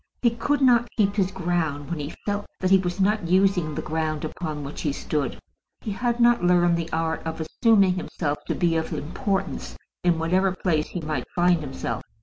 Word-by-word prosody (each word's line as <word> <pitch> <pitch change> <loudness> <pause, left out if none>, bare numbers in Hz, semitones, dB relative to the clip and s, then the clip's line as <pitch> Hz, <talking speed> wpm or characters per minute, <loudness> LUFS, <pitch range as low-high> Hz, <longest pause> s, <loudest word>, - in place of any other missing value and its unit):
He 235 - +5
could 280 +5 0
not 240 -2 +5
keep 200 -2 +2
his 195 -3 +2
ground 170 -5 -2
when 170 - -2
he 145 +1 -5
felt 205 0 -2
that 185 0 0
he 195 - +7
was 180 0 -3
not 200 -1 +2
using 180 -4 +2
the - - -3
ground 155 -1 -2
upon 155 -2 -5
which 140 +1 -6
he 150 - 0
stood. 140 -1 -2 0.4
He 215 - -4
had 240 +4 -1
not 235 -4 +4
learned 175 -1 +4
the 170 0 -3
art 160 0 -1
of 160 0 -4
assuming 195 +4 +3
himself 155 -4 -3
to - - -1
be 170 -2 +1
of 160 - -2
importance 190 +6 -3 0.3
in 175 -2 +3
whatever 185 +3 +1
place 160 -4 0
he 175 - -5
might 150 -5 -3
find 175 -1 +4
himself. 135 -5 -4
175 Hz, 195 wpm, -25 LUFS, 155-195 Hz, 0.4 s, he